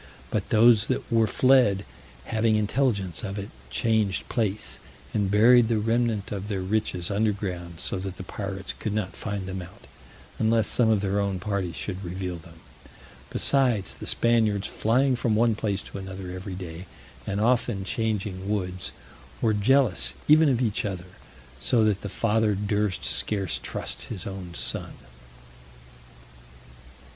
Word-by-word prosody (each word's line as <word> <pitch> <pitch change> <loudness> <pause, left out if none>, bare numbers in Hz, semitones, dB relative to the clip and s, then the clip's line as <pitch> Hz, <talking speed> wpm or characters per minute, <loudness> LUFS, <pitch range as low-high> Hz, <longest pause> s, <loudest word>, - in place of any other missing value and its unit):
But 105 -3 -1
those 110 -2 +5
that - - -2
were 115 -1 +4
fled, 125 -6 +4 0.4
having 110 0 +2
intelligence 105 - 0
of 100 -1 -4
it, 100 0 -6 0.2
changed 105 - 0
place, 110 -3 -2 0.3
and 100 -3 +1
buried 115 +3 +6
the 115 -1 +1
remnant 115 -1 0
of 100 -1 -4
their 100 -3 -2
riches 95 -2 -1
underground, 100 -5 -2
so - - -2
that 95 -1 -5
the - - -6
pirates 95 0 -5
could 105 -2 -4
not 100 -4 -2
find 100 -3 -4
them 95 0 -4
out, 90 0 -13 0.5
unless 110 -1 +3
some 120 -3 +2
of 110 -3 +3
their 100 0 0
own 100 -2 -1
party 95 -2 -2
should 95 +2 -5
reveal 90 0 -4
them. 80 0 -15 0.7
Besides, 125 -8 +2
the - - -6
Spaniards 110 -4 +2
flying 130 +4 +2
from 120 -3 0
one 115 +1 +3
place 105 -2 -2
to - - -8
another 95 -1 -7
every 90 +1 -6
day, 90 -1 -7 0.4
and 100 0 -1
often 115 -3 +1
changing 100 -2 -2
woods, 90 -3 -2 0.5
were 110 -2 +2
jealous 115 -1 +3
even 155 0 +6
of 125 -2 +1
each 110 -5 0
other, 90 -3 -5 0.5
so 110 - +2
that 105 -2 +2
the 100 - -5
father 110 +1 +1
durst 105 -1 -1
scarce 100 -5 0
trust - - -5
his 100 -6 -6
own 95 -3 -7
son. - - -3
105 Hz, 150 wpm, -26 LUFS, 95-110 Hz, 0.7 s, buried